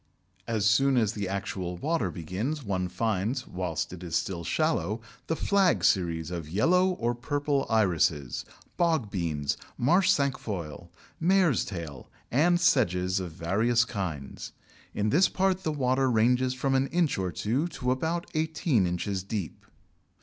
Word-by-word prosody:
As 110 -3 0
soon 135 +5 +4
as 110 -2 +2
the 100 -3 -3
actual 95 -2 -3
water 145 - 0
begins, 95 - -4
one 95 -4 -1
finds, 110 +6 -1
whilst 90 -2 -3
it 90 - -9
is 85 -2 -4
still 85 0 -1
shallow, 115 - 0 0.3
the 160 - 0
Flag 195 +1 +2
series 85 -3 +1
of 85 -4 -5
yellow 180 - +3
or 120 -10 -1
purple 140 +3 -1
Irises, 85 - +1 0.4
Bogbeans, 95 - 0 0.2
Marsh 180 +9 +3
Cinquefoil, 100 - -1 0.3
Mare's 175 - +3
Tail, 80 - -7 0.2
and 175 +7 +3
Sedges 95 - +2
of 90 -3 -5
various 110 +8 +2
kinds. 85 - -5 0.4
In 105 +1 0
this 180 +5 +4
part 190 -1 +1
the 160 - -1
water 130 -2 +1
ranges 125 +3 +2
from 135 +1 0
an 135 +1 +2
inch 170 - +1
or 95 -1 -1
two 125 - -1
to 125 -6 -2
about 165 +6 -1
eighteen 155 - +1
inches 95 +2 -2
deep. 95 - -5
110 Hz, 140 wpm, -28 LUFS, 90-145 Hz, 0.4 s, soon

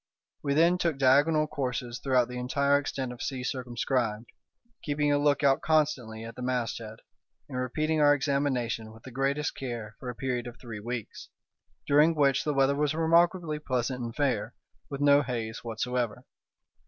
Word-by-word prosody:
We 140 -1 0
then 170 +3 +4
took 165 -5 0
diagonal 145 +4 +4
courses 125 -4 -3
throughout 130 -3 +2
the 125 0 -6
entire 140 +3 +2
extent 135 -3 -4
of 120 - -11
sea 130 -2 -3
circumscribed, 120 -3 -2 0.5
keeping 145 0 0
a 145 - +3
lookout 145 -1 +3
constantly 135 -8 0
at 115 0 -8
the - - -8
masthead, 115 -3 -3 0.5
and 125 - -4
repeating 155 +5 0
our 145 0 +6
examination 135 -6 -1
with 115 - -16
the 130 - -10
greatest 135 +4 -1
care 120 -5 -6
for 125 - -6
a 125 - -5
period 125 -1 -2
of 120 - -9
three 115 -4 -8
weeks, 120 0 -6 0.6
during 150 +3 +4
which 140 -3 +3
the 150 - 0
weather 135 +1 +3
was 150 +1 0
remarkably 165 -1 +2
pleasant 125 -3 -2
and 115 0 -5
fair, 125 -6 -1 0.3
with 140 0 -5
no 145 0 +6
haze 115 -4 -4
whatsoever. 120 0 -2
130 Hz, 165 wpm, -28 LUFS, 120-145 Hz, 0.6 s, our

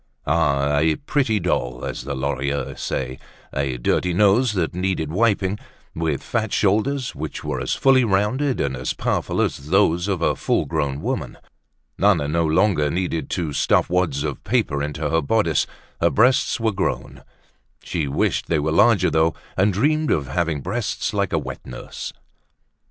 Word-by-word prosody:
Ah! 75 -2 +2
a 80 +1 +3
pretty 135 -7 0
doll, 60 -9 -1
as - - -5
the 70 0 -3
Lorilleuxs 70 +1 -2
say, 65 0 -3 0.3
a 70 -2 -1
dirty 85 +8 0
nose 105 +4 +4
that 90 -5 -1
needed 90 -4 -1
wiping, 105 0 +1 0.3
with 80 -4 -2
fat 110 -3 -2
shoulders, 115 +6 +1
which - - -6
were - - -2
as - - -1
fully 135 -1 +4
rounded 115 +7 +1
and 70 -1 -1
as 65 0 -3
powerful - - -1
as 70 +2 -1
those 90 -1 +3
of 95 -4 -1
a - - +2
full - - 0
grown 75 -3 -2
woman. - - -3 0.6
Nana 95 -8 +3
no 80 +2 +1
longer 80 -2 +2
needed 85 0 -2
to 80 -5 -2
stuff - - +2
wads 85 -6 +1
of 75 -3 -4
paper 95 - 0
into 75 +1 -2
her 80 +1 +1
bodice, 85 -1 +1 0.3
her - - +4
breasts 125 +2 +3
were 115 -1 +1
grown. 95 -1 -3 0.6
She 80 -5 -2
wished 70 - 0
they 85 - +1
were 75 +1 0
larger 105 +2 +4
though, 80 +1 +2 0.2
and 100 +3 +3
dreamed 150 +10 +1
of 70 -4 0
having 80 -2 -1
breasts 105 - -2
like - - 0
a - - +1
wet - - -5
nurse. - - -7
85 Hz, 165 wpm, -22 LUFS, 75-105 Hz, 0.6 s, nose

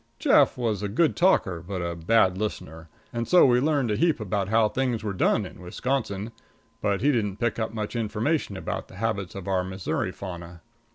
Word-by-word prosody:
Jeff - - +4
was 115 -5 -1
a 105 - -1
good 155 +10 +2
talker, 95 - +2
but 95 +2 -5
a 85 -1 -3
bad 95 +2 +3
listener, 80 -6 -5 0.2
and 115 0 -2
so 180 - +6
we 125 -2 +4
learned 140 -4 +1
a - - +1
heap 165 +3 +2
about 100 -2 -2
how 110 0 +4
things 125 -1 -1
were 105 -2 -2
done 100 +3 +2
in 90 - -11
Wisconsin, 110 +2 -3 0.5
but 100 -2 0
he 145 +4 +4
didn't 105 -6 -1
pick 120 -1 -1
up 110 - -2
much 110 0 -4
information 115 +1 -1
about - - -4
the - - -14
habits 100 -3 -2
of 95 -2 -7
our 95 -2 +1
Missouri 95 +5 -3
fauna. 85 -3 -8
105 Hz, 195 wpm, -26 LUFS, 95-120 Hz, 0.5 s, so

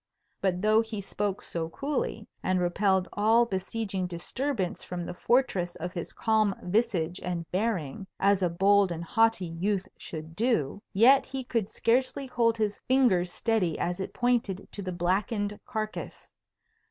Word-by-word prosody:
But 185 -1 0
though 215 +1 +5
he 220 -2 -5
spoke 200 0 -3
so 165 -1 -4
coolly, 270 - -3
and 185 0 +1
repelled 190 +1 +2
all 225 +3 +4
besieging 190 -1 -3
disturbance 185 +4 -2
from 175 -1 -5
the - - -5
fortress 185 -5 +1
of 175 +2 -5
his 170 - -5
calm 215 -3 +2
visage 180 -4 0
and 175 -2 -3
bearing, 190 -4 -1
as 200 -1 +3
a 180 - +2
bold 195 +2 +4
and 170 0 -4
haughty 225 +1 +2
youth 185 +4 -1
should 160 0 -7
do, 205 - 0
yet 260 +7 +6
he 265 -1 -4
could 230 -5 -1
scarcely 255 +3 +1
hold 235 -3 +1
his 210 -2 -1
finger 250 -9 +4
steady 180 -2 0
as 175 +2 -2
it 190 - -4
pointed 235 -6 0
to 205 - -6
the 185 -1 -4
blackened 200 +4 -1
carcase. 215 -3 -5
200 Hz, 155 wpm, -28 LUFS, 180-225 Hz, -, yet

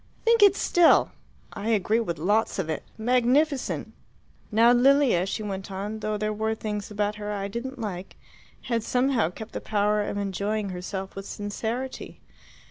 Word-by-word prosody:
Think 460 -1 +4
it 400 -1 +7
still! 350 -2 +4 0.4
I 215 - -4
agree 220 +1 +2
with 170 -8 -2
lots 205 +7 +1
of 165 -5 -2
it. 155 - -3 0.2
Magnificent!" 255 +5 +1 0.6
"Now 230 +3 +5
Lilia," 245 -6 +4
she 215 - -3
went 195 -2 -5
on, 205 +3 -4
"though 215 0 -2
there 215 +1 -1
were 220 +1 -1
things 210 -2 -4
about 210 0 -2
her 210 0 -4
I 200 -1 -3
didn't 245 +6 -5
like, 195 -5 -6 0.5
had 235 -2 -1
somehow 250 -5 +1
kept 220 +5 -9
the - - -5
power 210 0 +1
of 205 - -3
enjoying 200 +1 -2
herself 190 +1 -5
with 195 0 -7
sincerity. 225 +5 -5
215 Hz, 160 wpm, -26 LUFS, 200-240 Hz, 0.6 s, it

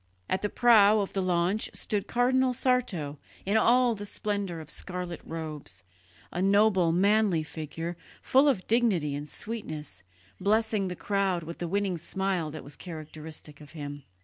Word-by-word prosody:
At 185 - 0
the 205 - -1
prow 215 -3 +6
of 200 - -2
the 195 - 0
launch 180 +3 +1
stood 205 -2 -2
Cardinal 255 +1 +2
Sarto 190 - 0 0.3
in 200 +3 +1
all 240 +2 +5
the 205 -1 -6
splendour 200 -5 -3
of 155 -1 -9
scarlet 180 -1 -5
robes, 155 -10 -7 0.5
a 175 - -2
noble 195 -3 +4
manly 195 -1 +3
figure, 165 +2 -5 0.2
full 275 +3 +4
of 200 -10 0
dignity 210 -11 +2
and 145 +1 -5
sweetness, 155 - -6 0.4
blessing 215 0 +1
the 180 - -4
crowd 195 -3 0
with 165 +1 -8
the 175 - -2
winning 195 -1 0
smile 190 -1 -1
that 155 0 -7
was 145 0 -8
characteristic 155 -2 -8
of 150 +2 -13
him. 145 -2 -6
185 Hz, 155 wpm, -28 LUFS, 160-215 Hz, 0.5 s, prow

